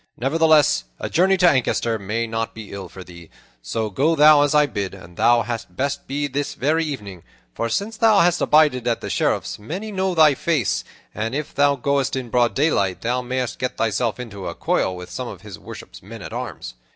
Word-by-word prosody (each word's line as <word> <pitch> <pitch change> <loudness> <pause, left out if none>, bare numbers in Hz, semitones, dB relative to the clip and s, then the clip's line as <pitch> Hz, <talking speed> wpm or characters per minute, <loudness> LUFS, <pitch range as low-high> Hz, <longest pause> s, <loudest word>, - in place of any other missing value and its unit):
Nevertheless, 155 - +3
a - - -5
journey 190 +3 +3
to 180 -1 +5
Ancaster 120 -6 +1
may 105 +4 -2
not 115 0 -4
be 110 -3 -9
ill 95 -3 -7
for 95 +1 -10
thee; 85 -2 -13 0.3
so 110 - -3
go 150 - +2
thou, 150 -1 +7
as 145 +1 +2
I 150 0 +5
bid, 100 -7 -4
and 90 -2 -14
thou 120 +3 +4
hadst 115 +1 -6
best 140 +1 -2
go 145 +1 -2
this 145 +1 -3
very 155 +5 +1
evening, 105 - -6 0.3
for 115 - -2
since 205 - -2
thou 215 -2 +5
hast 175 0 +2
abided 150 -6 +3
at 115 - 0
the - - -5
Sheriff's - - -1
many 185 - -6
know 190 -2 -1
thy 155 -3 +6
face, 130 - 0 0.3
and 115 +4 -3
if 150 0 -4
thou 145 0 +3
goest 140 0 0
in 125 -3 -5
broad 120 -1 +2
daylight, 100 - +1
thou 125 +2 -1
mayst 125 0 -3
get 125 0 -3
thyself 115 +1 0
into 100 -6 -7
a - - -5
coil 95 - 0
with 90 0 -9
some 125 -1 -5
of 95 -5 -9
his 105 -4 -10
worship's - - -11
men - - -10
at - - -8
arms. - - -6
125 Hz, 210 wpm, -21 LUFS, 110-150 Hz, 0.3 s, thou